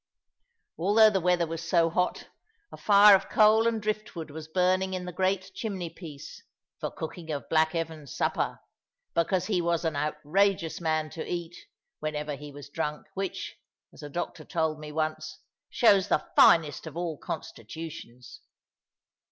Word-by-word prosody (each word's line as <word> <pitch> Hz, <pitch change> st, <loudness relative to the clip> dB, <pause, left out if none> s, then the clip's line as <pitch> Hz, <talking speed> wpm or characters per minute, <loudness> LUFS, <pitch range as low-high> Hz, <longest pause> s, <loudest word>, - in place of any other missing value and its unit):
Although 215 Hz, +5 st, +5 dB
the 190 Hz, -2 st, 0 dB
weather 175 Hz, 0 st, +2 dB
was 165 Hz, 0 st, -5 dB
so 165 Hz, -1 st, +2 dB
hot, 180 Hz, +2 st, -1 dB, 0.4 s
a -, -, -9 dB
fire 205 Hz, 0 st, +7 dB
of 195 Hz, -, -2 dB
coal 220 Hz, +1 st, +5 dB
and 230 Hz, -1 st, 0 dB
driftwood 210 Hz, -7 st, -4 dB
was 155 Hz, +1 st, -8 dB
burning 185 Hz, +2 st, +1 dB
in 180 Hz, -1 st, -4 dB
the 180 Hz, -, -5 dB
great 190 Hz, +1 st, -1 dB
chimney 190 Hz, -6 st, -4 dB
place, 150 Hz, -6 st, -10 dB, 0.4 s
for -, -, -3 dB
cooking 160 Hz, 0 st, -7 dB
of 145 Hz, -2 st, -4 dB
black 160 Hz, +1 st, +2 dB
Evan's 160 Hz, -4 st, -4 dB
supper; -, -, -1 dB, 0.5 s
because 170 Hz, +2 st, +1 dB
he 190 Hz, -5 st, 0 dB
was 170 Hz, 0 st, 0 dB
an 160 Hz, -2 st, 0 dB
outrageous 160 Hz, +5 st, 0 dB
man 155 Hz, -1 st, 0 dB
to 160 Hz, -, -5 dB
eat, 175 Hz, -1 st, -4 dB, 0.4 s
whenever 150 Hz, -1 st, -3 dB
he 145 Hz, +1 st, -10 dB
was 145 Hz, 0 st, -10 dB
drunk, 150 Hz, 0 st, -4 dB
which 195 Hz, -1 st, -4 dB, 0.4 s
(as -, -, -13 dB
a 145 Hz, -, -7 dB
doctor 175 Hz, +4 st, -5 dB
told 160 Hz, -2 st, -1 dB
me 150 Hz, 0 st, -8 dB
once) 155 Hz, 0 st, -3 dB, 0.3 s
shows 200 Hz, -5 st, +4 dB
the 150 Hz, -, +1 dB
finest 160 Hz, -1 st, +5 dB
of 160 Hz, +1 st, -8 dB
all 170 Hz, -4 st, -3 dB
constitutions. 125 Hz, -1 st, -8 dB
165 Hz, 155 wpm, -28 LUFS, 155-190 Hz, 0.5 s, fire